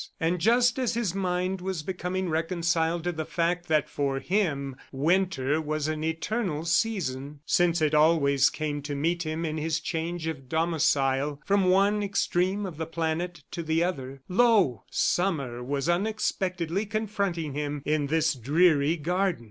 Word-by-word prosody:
And 175 +1 0
just 240 +4 +3
as 245 -2 0
his 230 -7 -1
mind 185 -1 -1
was 185 -4 -3
becoming 185 +1 -3
reconciled 165 0 0
to 175 - 0
the 160 -2 -4
fact 175 +2 -1
that 155 -2 +2
for 140 -2 -1
him 145 -8 -1 0.2
Winter 155 -1 +1
was 155 -1 -2
an 155 0 -2
eternal 165 0 -2
season 150 - -1
since 170 -1 +2
it 155 - +2
always 150 -3 +4
came 150 -2 -3
to 145 0 -4
meet 165 +5 0
him 160 0 -3
in 155 0 -2
his 160 +1 -1
change 165 +1 -3
of 140 -5 -5
domicile 145 -3 +1
from 200 -1 +3
one 200 +3 +3
extreme 195 0 0
of 175 -5 -7
the 160 0 -3
planet 165 0 -3
to 170 - -4
the 160 +1 +1
other 135 -6 -4
lo, 190 - +3
Summer 140 -10 0
was 140 +3 -2
unexpectedly 185 -1 -1
confronting 200 -8 -2
him 145 -1 -3
in 150 -1 +1
this 160 +1 +2
dreary 150 +4 +3
garden! 180 +4 0
165 Hz, 155 wpm, -27 LUFS, 150-185 Hz, 0.2 s, always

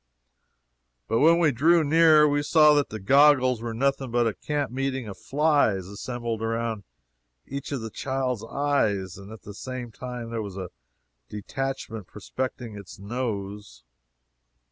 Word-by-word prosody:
But 115 +1 +1
when 165 +3 +6
we 165 -3 +3
drew 160 +7 +4
near, 155 0 +6
we 145 0 +1
saw 150 0 +5
that 145 -2 +1
the 110 - -6
goggles 130 +1 +4
were 115 0 -4
nothing 135 +2 0
but 120 0 +1
a 115 - 0
camp 145 -1 -3
meeting 135 -2 -2
of 100 - -7
flies 140 - +1
assembled 115 +3 -5
around 115 -1 -2 0.6
each 140 +1 -6
of 135 -4 -2
the 110 -1 -6
child's 130 -3 -2
eyes, 110 -9 -1
and 100 +2 -11
at 110 - -11
the 105 - -9
same 125 +2 -6
time 125 -1 -7
there 115 -1 -2
was 100 -3 -7
a 90 -2 -6 0.6
detachment 115 -1 -5
prospecting 120 +2 -5
its 100 -3 -10
nose. 100 - -5
120 Hz, 150 wpm, -25 LUFS, 105-140 Hz, 0.6 s, when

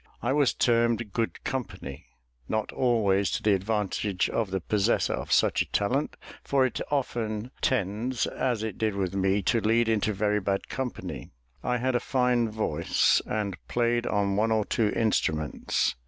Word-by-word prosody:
I 120 +3 +1
was 145 -2 +2
termed 115 -3 +1
"good 115 -1 -2
company," 95 - -5 0.4
not 110 -1 -1
always 100 -6 +2
to - - -2
the 105 - +4
advantage 100 -1 -1
of 110 -4 -1
the 95 0 -1
possessor 105 +5 +1
of - - -5
such - - +3
a - - -3
talent; 125 +8 0 0.3
for 135 -2 +2
it 130 - -2
often 120 -5 -2
tends, 115 +2 0
as 120 -4 -1
it 110 - -4
did 110 -2 0
with 95 -2 -1
me, 95 +1 +1
to 115 +4 +2
lead 115 +2 +2
into 110 -1 +1
very 105 +1 +1
bad 100 0 -2
company. 130 -2 -5 0.3
I 125 0 +1
had 130 +2 0
a 120 - +2
fine 125 -2 +1
voice, 105 -8 +2
and 105 -3 -2
played 120 0 +1
on 100 -1 +1
one 110 +2 +1
or 110 -2 +2
two 110 -3 +1
instruments. 80 -9 0
110 Hz, 165 wpm, -27 LUFS, 100-120 Hz, 0.4 s, the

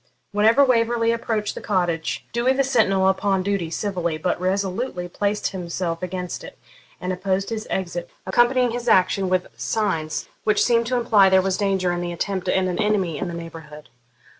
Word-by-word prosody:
Whenever 220 +7 +5
Waverley 230 -2 +2
approached 225 -2 -1
the - - -8
cottage 175 -5 -1
door 240 +2 +2
the 275 +1 +2
sentinel 215 -8 +2
upon 190 0 +1
duty 195 -4 -1
civilly, 170 -3 -2
but 180 +2 -2
resolutely, 190 +1 -1
placed 205 +3 -1
himself 170 -2 -4
against 180 -1 -4
it - - -11 0.4
and 185 +1 -2
opposed 190 +2 -1
his 220 -1 -4
exit, 175 -2 -3 0.2
accompanying 240 +5 +3
his 240 +1 -5
action 190 -2 +3
with 185 -1 +1
signs 165 -8 -2 0.2
which 215 -1 +3
seemed 235 -1 +2
to 255 - 0
imply 220 -5 +5
there 190 0 +5
was 190 0 0
danger 190 -3 0
in 175 0 -2
the 175 0 -3
attempt 185 +1 -3
and 185 0 +2
an 180 - -2
enemy 195 -8 0
in - - -2
the 170 - -5
neighbourhood. 160 -4 -10
190 Hz, 175 wpm, -23 LUFS, 180-220 Hz, 0.4 s, Whenever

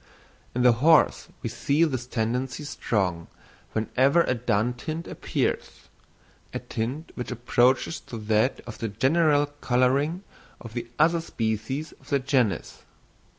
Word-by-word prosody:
In 125 - +1
the 125 - +7
horse 165 +3 +5 0.2
we - - -1
see 145 +4 +1
this 130 -6 -1
tendency 125 +4 -2
strong 95 - -1 0.5
whenever 130 +9 +3
a - - +1
dun 120 -1 0
tint 155 +7 -5
appears—a - - -5
tint 130 +9 -4
which 125 - -5
approaches 125 +5 +2
to 115 - -9
that 110 +3 +1
of 115 -2 -10
the 115 - -2
general 145 +7 +3 0.2
colouring 135 +8 +2 0.4
of 115 -2 -10
the 120 -1 -4
other 165 +2 +4
species 115 +3 -3
of - - -19
the 140 - +3
genus. 130 - 0
125 Hz, 130 wpm, -26 LUFS, 115-145 Hz, 0.5 s, the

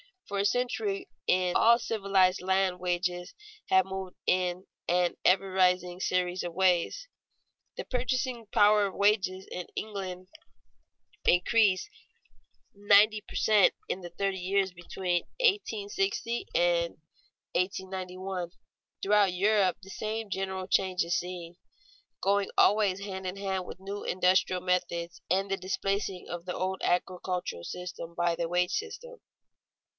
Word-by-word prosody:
For 200 - -3
a 200 - +1
century 380 - -1 0.2
in 180 -1 +2
all 235 +1 +6
civilized 195 -5 +2
lands 190 -1 +1
wages 180 0 -2 0.3
have 190 -1 +5
moved 190 -1 -6
in 180 0 +1 0.2
an 175 0 +2
ever 195 +1 +4
rising 180 -1 +2
series 180 -1 0
of 175 -1 -5
waves. 190 - +1 0.7
The - - -5
purchasing 250 -2 -2
power 210 0 +5
of 190 - -8
wages 195 -2 +2
in 180 - -5
England 185 -3 -5 1.0
increased 190 +1 +3 0.8
ninety 205 +1 +5
per - - -13
cent, 210 -3 +4
in 190 - -2
the 175 - -7
thirty 195 +2 -2
years 190 +1 +1
between 175 0 -2 0.2
1860 230 - 0
and - - +2 0.6
1891. 185 -1 -3 0.5
Throughout 200 -2 +4
Europe 195 0 +2
the 195 - -12
same 215 +1 -4
general 190 -1 -3
change 185 -1 +1
is 170 +1 0
seen, 175 -1 -7 0.6
going 200 0 +2
always 200 -2 +4
hand 190 -2 -5
in 185 - -4
hand 190 -2 -3
with 185 - -10
new 200 +1 -6
industrial 185 0 +2
methods 175 -2 -1
and 195 +3 +1
the 195 - +1
displacing 195 0 -2
of 175 0 -6
the 180 - -4
old 190 +1 -2
agricultural 180 - -1
system 170 -1 -7
by 175 0 +1
the 170 0 -2
wage 180 +1 +1
system. 475 +3 -5
190 Hz, 130 wpm, -29 LUFS, 180-205 Hz, 1.0 s, all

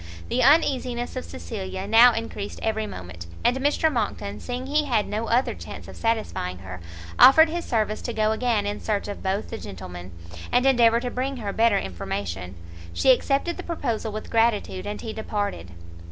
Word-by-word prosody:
The 250 - +1
uneasiness 255 -4 +2
of 255 - -4
Cecilia 190 -3 -6
now 230 +4 +7
encreased 225 -3 -5
every 220 -1 -1
moment; 90 - -9 0.2
and 245 - +3
Mr 290 +3 +2
Monckton, 200 - -3
seeing 250 +1 -5
he 300 +2 +1
had 230 -7 +1
no 220 +2 -3
other 245 +3 +2
chance - - -9
of - - -10
satisfying 220 - -2
her, 90 -1 -9 0.4
offered 320 +4 +8
his 340 +1 -3
service 215 -3 -1
to 240 - -4
go 215 -1 +1
again 220 -2 0
in 205 0 -3
search 210 -2 -2
of 205 - -6
both 195 +2 -2
the 225 - -5
gentlemen, 90 -1 -8 0.4
and 250 +1 +3
endeavour 235 -3 +5
to 245 -1 -3
bring 265 +2 -2
her 205 -4 -4
better 225 -2 +3
information. 90 - -4 0.4
She 265 - +4
accepted 275 +6 +1
the - - -5
proposal 235 -10 -3
with 215 +1 -7
gratitude, 225 -4 +1
and 210 - -4
he 220 - -5
departed. 205 - -3
225 Hz, 180 wpm, -24 LUFS, 200-250 Hz, 0.4 s, offered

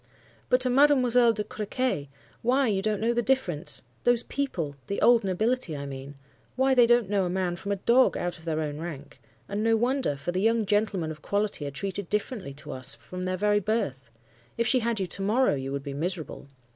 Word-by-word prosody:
But 250 - +3
to 255 - 0
Mademoiselle 250 -3 +5
de 210 -1 -2
Crequy, 210 - -2 0.3
why 260 +4 +2
you 195 -2 +1
don't 210 0 0
know 230 +2 +2
the 240 - +1
difference! 195 - -1 0.2
Those 240 -1 +3
people—the 170 - -3
old 235 -2 +5
nobility 195 - 0
I 140 - -5
mean—why 140 - -3
they 245 -2 +6
don't 240 -3 +4
know 200 -1 +1
a - - -1
man 180 -1 -1
from 200 +3 -5
a - - +2
dog, 235 +6 +3
out 175 -1 -3
of 160 - -16
their 160 -1 -1
own 150 -1 -4
rank! 150 -6 -8 0.3
And 205 +2 -2
no 225 0 +3
wonder, 250 - +1
for 175 - -3
the 185 +1 -1
young 225 +1 +2
gentlemen 200 -5 0
of 155 -1 -10
quality 200 -7 -1
are - - -2
treated 190 +6 -4
differently 210 - -3
to 145 - -8
us 130 +2 -4
from 180 +4 -7
their 185 0 -1
very 205 +1 +2
birth. 145 - -2 0.5
If 235 - +1
she 255 +2 +4
had 230 -2 -1
you 190 - 0
to 180 +2 -4
morrow, 225 +7 +3
you 135 -1 -3
would 140 0 -3
be 140 -1 -5
miserable. 160 -1 -4
200 Hz, 210 wpm, -27 LUFS, 155-235 Hz, 0.5 s, they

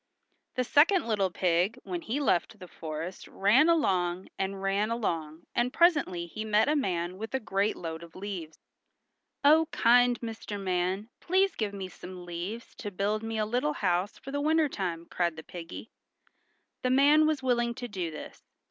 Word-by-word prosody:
The 255 - +1
second 320 - +4
little 200 -4 +1
pig 180 +5 +1
when 350 -2 -4
he 270 -1 -2
left 225 -5 +1
the 185 - -11
forest 160 +2 -6
ran 235 +11 +4
along 185 - +1
and 195 0 -2
ran 195 +2 0
along 165 -9 -2
and 240 +1 +1
presently 290 - +3
he 215 +6 -6
met 215 0 +3
a 300 - +2
man 180 - -1
with 225 +4 -4
a - - +1
great 205 -2 0
load 165 -1 -6
of 170 -1 -13
leaves. 185 -5 -6 0.9
"Oh, 315 +2 +6
kind 245 +1 +4
Mr. 225 -3 -6
Man, 190 +3 -1
please 385 +2 +2
give 205 -3 -3
me 190 -1 -5
some 180 -1 -10
leaves 180 +8 -6
to 210 - -5
build 205 +2 -1
me 225 0 -4
a 215 - +1
little 250 +7 0
house 185 -3 0
for 270 - -9
the 285 +1 -1
winter 315 +1 +3
time," 175 -9 -4
cried 170 -1 -1
the 160 - -9
piggy. 170 +6 -9 0.9
The 255 - 0
man 290 +4 +5
was 310 -4 0
willing 240 -2 +1
to 245 -1 -5
do 185 -6 -3
this. 155 - -9
210 Hz, 175 wpm, -29 LUFS, 180-255 Hz, 0.9 s, Oh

